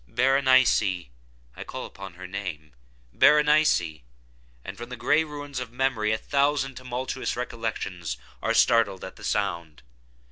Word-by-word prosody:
Berenice!—I 95 - +1
call - - -6
upon 95 -2 -10
her 95 +1 -9
name—Berenice!—and 65 - 0
from 120 +1 -8
the 125 - -5
gray 150 +7 +3
ruins 145 -3 -6
of 125 -2 -6
memory 125 -4 0
a 110 - +1
thousand 140 +1 0
tumultuous 130 +1 -4
recollections 110 - -4 0.2
are - - 0
startled 110 -5 +3
at 95 - -8
the - - -13
sound! 85 - -2
105 Hz, 115 wpm, -26 LUFS, -, 0.2 s, gray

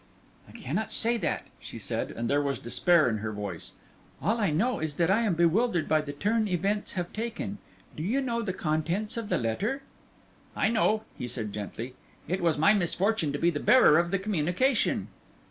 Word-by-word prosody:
"I - - -13
cannot 185 +12 -3
say 235 +1 +3
that," 195 - -2
she - - -9
said, - - -3
and 115 +1 -4
there 145 +4 +2
was 140 -1 -1
despair 170 +6 +3
in 110 -2 0
her 110 +1 -3
voice; 100 -5 -6 0.5
"all 210 +11 0
I 205 - +2
know 220 +12 +1
is 155 -2 -3
that 170 +3 +2
I 215 +4 +3
am 210 -7 +1
bewildered 170 +1 +2
by 155 -1 +3
the 145 -1 -6
turn 210 +9 0
events 200 +3 -1
have 175 -2 -4
taken. 220 -2 -4 0.4
Do - - -6
you 220 +11 0
know 235 -3 -1
the 210 -4 -2
contents 175 +6 -1
of 230 -3 -4
the - - +2
letter?" 210 - -2 0.7
"I - - +2
know," 220 -1 +2
he 125 - -5
said, 110 -4 -4
gently; 115 +4 -6 0.3
"it 180 +4 -1
was 165 -3 +2
my 180 +8 +5
misfortune 190 -2 +1
to - - -1
be 170 +4 +2
the 145 - -3
bearer 210 -10 +6
of 170 0 0
the 195 - +1
communication." 195 - 0
175 Hz, 195 wpm, -28 LUFS, 150-215 Hz, 0.7 s, bearer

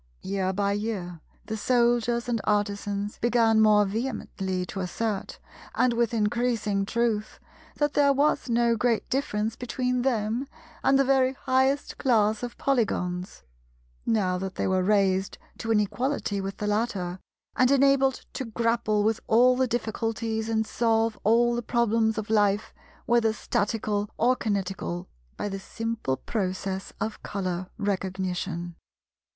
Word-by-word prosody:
Year 190 -1 -1
by 200 +1 0
year 200 -5 -3 0.2
the 220 - -4
Soldiers 240 +1 +2
and 235 -3 0
Artisans 205 0 -1
began 230 -2 +3
more 210 -1 +5
vehemently 195 -4 -3
to 190 - -6
assert—and 215 +5 -2
with 235 -1 +1
increasing 215 -2 0
truth—that 235 +6 -2
there 285 -1 +4
was 280 -1 +1
no 235 0 +3
great 230 0 +1
difference 225 -5 -1
between 250 +1 -1
them 240 0 0 0.4
and 270 - +4
the 275 - +4
very 265 -1 +3
highest 265 +2 0
class 220 -5 +2
of 245 -1 -6
Polygons, 185 - -1 0.6
now 185 -5 +1
that 190 0 -5
they - - -1
were 185 0 +2
raised 195 -1 +2 0.2
to 225 - -5
an 220 -2 +4
equality 210 -1 -1
with 195 0 -5
the 210 - -3
latter, 205 -4 -1 0.4
and 255 - +4
enabled 275 -1 +3
to 265 - -3
grapple 230 -2 0
with 220 +1 +1
all 250 +3 +5
the 260 0 +1
difficulties 225 -1 -2
and 220 -1 +1
solve 225 -1 +1
all 235 +3 +4
the 240 - -1
problems 225 -1 +1
of 220 0 -4
life, 205 -1 +2 0.3
whether 235 -2 +3
Statical 210 -1 -1
or 250 +2 +3
Kinetical, 195 -5 -3 0.3
by - - -2
the 195 -1 -4
simple 225 -10 -3
process 190 - -3
of 220 0 -3
Colour 185 -2 -3
Recognition. 185 -3 -2
220 Hz, 135 wpm, -26 LUFS, 200-240 Hz, 0.6 s, more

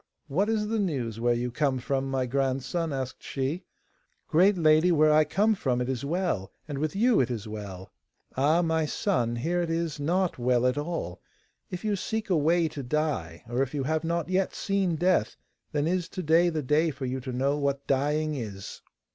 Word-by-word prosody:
'What 185 +9 0
is 210 -1 0
the 225 0 0
news 130 - -2
where 120 +1 +2
you 120 +1 -2
come 135 0 +1
from, 135 +1 -2
my 130 -1 0
grandson,' 135 +5 -1
asked 130 -2 -4
she. 145 +7 -3 0.6
'Great 185 +5 +4
lady, 155 +1 +5
where 155 -2 +5
I 155 +1 +6
come 205 +9 +2
from 130 -11 -1
it 125 - -1
is 130 -1 -2
well, 145 - -1 0.2
and 145 -3 -4
with 155 +4 -2
you 235 +3 +4
it 130 - +2
is 115 -4 -4
well.' 100 -3 -7 0.4
'Ah, 155 +6 +3
my 160 -1 +1
son, 120 - 0
here 170 +9 0
it 170 - -2
is 165 -2 -2
not 175 +2 0
well 125 0 +2
at 125 - +2
all. 145 - -4 0.5
If 180 +3 -6
you 210 -1 +1
seek 220 +1 -3
a - - +4
way 165 +2 +3
to 150 -2 -6
die, 130 - -2
or 120 +2 -1
if 135 +2 -2
you 140 - -1
have 155 +3 0
not 170 0 -1
yet 185 +1 0
seen 195 -4 0
death, 175 -8 +1 0.4
then 145 -1 0
is 180 +1 0
to 185 - -5
day 165 +3 +4
the 155 -3 -2
day 150 +5 +2
for 140 -2 -5
you 130 +1 -2
to 130 0 -6
know 135 +3 +1
what 140 -1 -1
dying 150 +3 +1
is. 105 -8 -6
150 Hz, 205 wpm, -27 LUFS, 130-170 Hz, 0.6 s, I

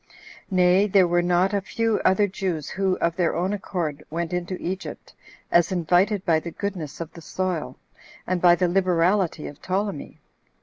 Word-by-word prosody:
Nay, 185 +1 +4
there 190 -2 +4
were 175 0 +2
not 180 +3 +2
a 200 - +1
few 225 +3 -1
other 190 +2 +4
Jews 185 -6 -3
who, 190 -1 0
of 170 0 0
their 175 -2 +1
own 185 +4 0
accord, 165 -7 -3
went 170 +2 -3
into 180 +1 -3
Egypt, 190 +3 -6 0.4
as 170 0 +4
invited 185 +3 +2
by 165 -3 +3
the 170 - -7
goodness 175 -5 -5
of 165 -1 -6
the 170 - -11
soil, 165 -8 -3 0.5
and 185 -1 -1
by 175 -1 +7
the 180 0 +1
liberality 180 -1 +1
of 145 - -9
Ptolemy. 190 -3 -3
180 Hz, 170 wpm, -24 LUFS, 170-190 Hz, 0.5 s, by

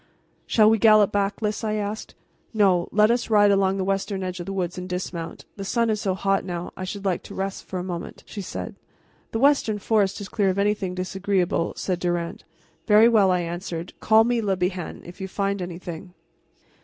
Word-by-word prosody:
"Shall 215 -2 +5
we 220 0 +4
gallop 215 -2 +6
back, 205 +2 -1
Lys?" 210 +1 -1
I 215 -1 0
asked. 210 0 -4 0.4
"No; 190 -5 +3
let 210 +2 +4
us 240 0 0
ride 205 -2 +5
along 195 -1 +2
the 190 - -1
western 195 0 -1
edge 185 0 -4
of 175 - -6
the - - -3
woods 185 -2 -2
and 180 0 -6
dismount. 180 -2 -5
The 195 - -5
sun 230 +3 +1
is 215 -1 -1
so 190 -2 0
hot 195 0 +1
now, 175 -1 -4
and - - -23
I 185 - -5
should 200 +2 -6
like 185 -3 0
to - - -11
rest 195 0 -4
for 190 - -5
a 180 - -3
moment," 175 -2 -6
she 205 - -7
said. - - -6 0.6
"The - - -1
western 270 -4 +3
forest 205 -2 +1
is 200 - -6
clear 205 -2 +1
of 185 - -1
anything 200 -2 0
disagreeable," 185 -1 -1
said 180 -2 -2
Durand. 175 -1 -2 0.4
"Very 215 +1 +7
well," 215 -5 +4
I 180 -1 +2
answered; 175 0 -5
"call 220 0 +5
me, 240 0 +1
Le 195 -3 0
Bihan, 180 -1 -3
if 175 +2 -11
you 190 - -3
find 200 0 -2
anything." 175 0 -7
195 Hz, 210 wpm, -24 LUFS, 180-210 Hz, 0.6 s, Very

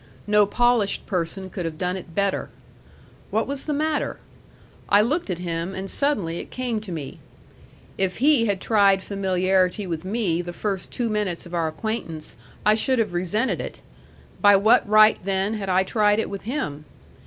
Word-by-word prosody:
No 210 -1 +4
polished 240 -2 +2
person 185 0 -3
could 180 - -4
have 165 -2 -4
done 180 +2 -1
it 175 -3 -9
better. 200 -1 0 0.8
What 220 +2 0
was 280 0 -4
the - - 0
matter? 305 +1 -1 0.7
I 205 +1 +6
looked 295 - -1
at 180 - -1
him, 170 +1 -4
and 195 +1 -4
suddenly 205 - 0
it - - -8
came 245 -4 -3
to 205 -4 -8
me. 155 -5 -6 0.8
If 190 -1 0
he 270 -3 +4
had 200 -2 0
tried 200 -2 +3
familiarity 190 0 +1
with 165 -3 -4
me 190 -4 0
the 175 0 -7
first 195 -1 -3
two 240 - -1
minutes 210 -6 -2
of 175 - -12
our 165 -2 0
acquaintance, 160 - -4 0.3
I 210 - +6
should 255 +4 +1
have 215 -5 0
resented 185 +8 0
it; - - -8 0.6
by 205 -1 +7
what 205 +1 +4
right, 215 +1 +6
then, 195 +2 0
had 200 -3 -4
I 185 +1 +3
tried 210 +1 +2
it 225 - -2
with 200 -1 -6
him? 150 - -3
200 Hz, 175 wpm, -23 LUFS, 180-220 Hz, 0.8 s, by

